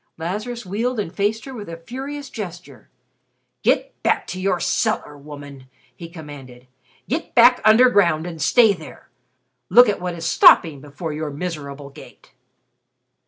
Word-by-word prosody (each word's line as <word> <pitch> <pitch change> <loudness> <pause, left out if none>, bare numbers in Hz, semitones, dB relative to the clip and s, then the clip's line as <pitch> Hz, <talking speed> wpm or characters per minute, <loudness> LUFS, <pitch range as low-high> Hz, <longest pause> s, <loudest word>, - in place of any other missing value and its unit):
Lazarus 210 +8 -5
wheeled 225 +6 -2
and 185 -4 -4
faced 210 +3 -1
her 270 - -8
with 210 -7 -8
a 165 - -7
furious 270 +10 -8
gesture. 175 - -9 0.7
"Get - - 0
back - - 0
to 185 +1 -5
your 185 -2 0
cellar, 150 -2 -1
woman," 145 -2 -12 0.3
he 170 -1 -10
commanded. 140 -6 -12 0.4
"Get 310 +6 -4
back 245 +1 +6
under 220 +4 +6
ground 175 -9 +2
and 165 -3 -7
stay 225 - +4
there. 160 -5 -13 0.6
Look 245 +6 +7
at 205 -3 -1
what 180 -1 -4
is 165 -1 -7
stopping 160 -3 +5
before 150 +3 -7
your 155 0 -4
miserable 145 -3 -7
gate." 130 - -16
175 Hz, 150 wpm, -21 LUFS, 150-215 Hz, 0.7 s, Look